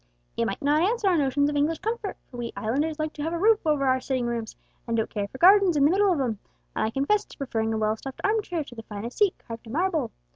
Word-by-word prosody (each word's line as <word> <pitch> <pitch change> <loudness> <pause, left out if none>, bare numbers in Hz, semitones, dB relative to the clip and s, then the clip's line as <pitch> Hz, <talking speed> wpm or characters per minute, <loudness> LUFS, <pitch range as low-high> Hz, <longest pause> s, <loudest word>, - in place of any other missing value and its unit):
It - - 0
might - - -4
not 295 +2 +3
answer 425 +3 +1
our 370 - +4
notions 285 +1 +2
of 295 - -2
English 300 +3 +1
comfort, 440 0 -3
for 245 - -12
we 235 -1 -4
Islanders 290 +8 -1
like 310 0 -3
to 295 - -7
have 325 +3 -2
a - - -1
roof 425 +4 +4
over 295 -3 +2
our 260 0 +2
sitting 255 -2 -1
rooms, 235 -2 -3 0.3
and 230 0 0
don't 220 - +1
care 205 -2 -2
for 260 - -11
gardens 375 0 +6
in 280 - +4
the 300 - +5
middle 395 +1 +3
of 335 - +1
'em; 235 -6 -1 0.4
and - - 0
I - - -1
confess 280 - +1
to - - -15
preferring 225 -5 -2
a 220 - -1
well 215 0 +1
stuffed 265 +4 -9
arm 430 +2 +2
chair 345 -6 -3
to 260 - -13
the 225 - -8
finest 225 - -7
seat 410 -3 +4
carved 230 0 -10
in 220 - -8
marble. 325 -6 0
285 Hz, 280 wpm, -26 LUFS, 235-355 Hz, 0.4 s, gardens